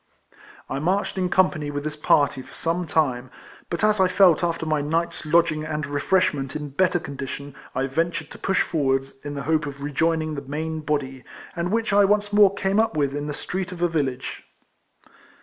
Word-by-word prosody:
I 135 - -3
marched 185 +7 0
in 185 -1 0
company 165 -6 +2
with 145 0 -4
this 155 0 -4
party 145 -2 +2
for - - -14
some 170 +1 -1
time, 130 -6 0 0.4
but 170 +4 -3
as 215 -1 +3
I 190 - +5
felt 180 -2 +4
after 165 -1 -1
my 155 -2 +1
night's 165 +2 -2
lodging 165 -1 +3
and 155 -1 -3
refreshment 145 -1 0
in 150 -1 -4
better 175 +6 +2
condition 140 -1 -6 0.2
I 130 +1 +1
ventured 165 +3 -2
to - - -11
push 195 - +2
forwards, 135 -3 -1
in 145 0 -5
the 140 - -4
hope 160 -1 +1
of 140 0 -7
rejoining 155 +2 0
the 140 - -4
main 155 +3 -4
body, 140 -4 -2 0.3
and 170 0 -1
Avhich 225 -1 0
I 205 0 +6
once 205 +1 +1
more 205 -2 +7
came 195 +1 +1
up 220 -8 +1
with 140 -1 0
in 145 0 -3
the 145 - -4
street 185 +2 -4
of 175 -1 -4
a - - +5
village. 135 -6 -3
155 Hz, 195 wpm, -24 LUFS, 145-180 Hz, 0.4 s, more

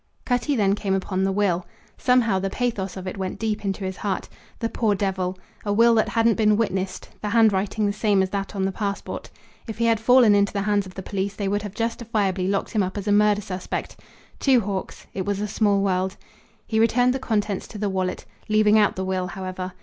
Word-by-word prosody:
Cutty 245 +3 +1
then 200 -4 +3
came 200 -2 -1
upon 190 0 -1
the 195 - +1
will. 190 -3 +1 0.3
Somehow 240 -6 +2
the 195 +1 -2
pathos 195 -5 -2
of 190 - -7
it 185 - -5
went 190 -1 -3
deep 220 -2 -2
into 195 0 -2
his 190 0 -4
heart. 200 -2 -2 0.3
The 230 - -1
poor 220 -2 +1
devil! 190 -2 -1 0.3
a 205 - -1
will 230 +3 +5
that 220 -1 +2
hadn't 230 -1 +2
been 215 -2 +4
witnessed, 190 -4 -2
the 210 - -2
handwriting 210 -1 +2
the 205 - +1
same 205 -2 +2
as 190 - -3
that 200 +1 -3
on 190 -1 0
the 195 - 0
passport. 200 0 -4 0.4
If 225 - -6
he 235 - +1
had 230 -1 +3
fallen 240 -1 +6
into 200 0 +2
the 200 -1 -1
hands 205 -1 +1
of 185 - -13
the 190 - -6
police 200 +1 -3
they 200 - -2
would 205 +1 0
have 205 -1 -7
justifiably 215 -5 -1
locked 195 0 -1
him 215 - +1
up 190 +1 -2
as 205 +1 -5
a - - +2
murder 210 0 +4
suspect. 185 -2 -5 0.4
Two 260 -4 +4
Hawks! 195 -2 -5
It 190 - -2
was 200 0 -2
a 210 - -1
small 205 -1 +2
world. 190 0 0 0.5
He 220 - 0
returned 245 +2 +3
the 265 - -2
contents 210 -5 -1
to 215 - -9
the 205 0 -1
wallet, 185 -1 -2 0.2
leaving 215 0 +5
out 210 - +3
the 190 - -3
will, 185 -1 -1
however. 185 0 -5
205 Hz, 225 wpm, -24 LUFS, 190-220 Hz, 0.5 s, fallen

